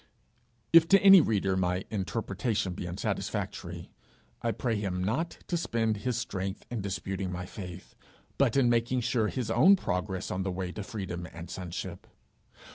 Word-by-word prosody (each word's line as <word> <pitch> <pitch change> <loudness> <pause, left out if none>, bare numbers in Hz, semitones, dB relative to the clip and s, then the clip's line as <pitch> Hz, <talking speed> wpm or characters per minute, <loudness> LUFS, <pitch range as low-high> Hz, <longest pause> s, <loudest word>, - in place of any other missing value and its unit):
If 165 -1 +8
to 195 +2 +7
any 195 -2 +10
reader 100 -7 +1
my 90 0 0
interpretation 100 -1 -1
be 90 - -5
unsatisfactory, 90 +1 -4 0.5
I 115 - +1
pray 115 0 -1
him 95 -3 -2
not 145 - -1
to 175 - -2
spend 115 -8 0
his 125 +3 -2
strength 95 -4 -4
in 120 -3 -2
disputing 95 -1 -3
my 90 0 -4
faith, 90 -2 -9 0.5
but 135 -2 +3
in 130 -3 +5
making 120 +2 +2
sure 115 -2 +1
his 125 0 -3
own 175 +12 +7
progress 95 - -3
on 90 - -1
the 95 0 -1
way 90 0 -3
to 105 - -6
freedom 95 -4 -5
and 85 +1 -9
sonship. 90 -2 -6
100 Hz, 160 wpm, -29 LUFS, 95-120 Hz, 0.5 s, any